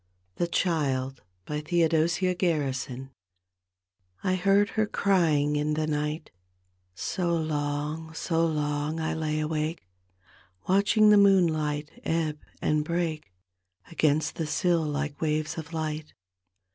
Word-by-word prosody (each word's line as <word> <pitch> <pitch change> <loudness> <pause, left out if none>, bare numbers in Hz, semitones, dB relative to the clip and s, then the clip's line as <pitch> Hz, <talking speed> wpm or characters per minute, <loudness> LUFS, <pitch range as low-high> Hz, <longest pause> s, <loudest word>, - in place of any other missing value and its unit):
THE 175 - 0
CHILD: 135 -7 0 0.3
theodosia 165 +3 +1
gaksison 135 -7 -2 1.1
I 185 -1 +1
heard 195 +2 +3
her 215 -1 0
crying 160 -8 +2
in 150 +1 0
the 155 0 0
night, 150 +1 -2 0.4
— 90 - -44 0.2
So 170 - -1
long, 150 0 -2
so 165 0 0
long 150 0 -1
I 160 - -1
lay 155 -1 -1
awake. 155 - -2 0.8
Watching 205 +3 +5
the 210 - +7
moonlight 155 -7 +3
ebb 160 -2 -1 0.2
and 150 0 +2
break 160 - -2 0.6
gainst 155 0 +1
the 160 - -2
sill 170 +2 +2
like 150 -1 -3
waves 155 -1 0
of 160 0 -8
light. 155 -1 -4
155 Hz, 115 wpm, -27 LUFS, 150-170 Hz, 1.1 s, the